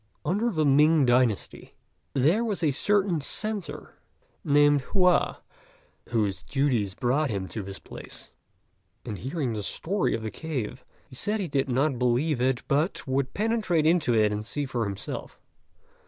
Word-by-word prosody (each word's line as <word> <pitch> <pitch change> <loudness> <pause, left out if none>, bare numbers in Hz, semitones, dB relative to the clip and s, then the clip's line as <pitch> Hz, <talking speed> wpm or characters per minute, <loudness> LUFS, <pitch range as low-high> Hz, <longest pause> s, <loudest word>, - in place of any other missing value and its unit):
Under 210 +7 +1
the 155 -8 0
Ming 150 +1 +5
dynasty, 120 -4 0 0.4
there 160 - +3
was 210 -6 -2
a 150 - +3
certain 190 +2 +1
Censor, 215 +5 -4 0.4
named 145 0 +4
Hua, 180 +4 +2 0.7
whose 105 -6 0
duties 125 -7 0
brought 135 +5 +1
him 100 -4 -3
to 105 - -4
this 95 -1 -7
place; - - -11 0.7
and 105 - -5
hearing 135 -2 -2
the 105 - -3
story 190 - -1
of 110 - -5
the 110 - -4
cave, 130 -6 -5 0.2
he 130 - -14
said 210 - -1
he 190 - -2
did 140 -2 -1
not 130 +1 +1
believe 125 +3 +1
it, 130 -1 +1
but 150 +6 0
would 130 0 -1
penetrate 210 -7 +1
into 160 -7 +3
it 105 -1 +3
and 105 0 -3
see 145 +6 -3
for 120 -4 -2
himself. 100 -1 -6
140 Hz, 155 wpm, -27 LUFS, 120-165 Hz, 0.7 s, Ming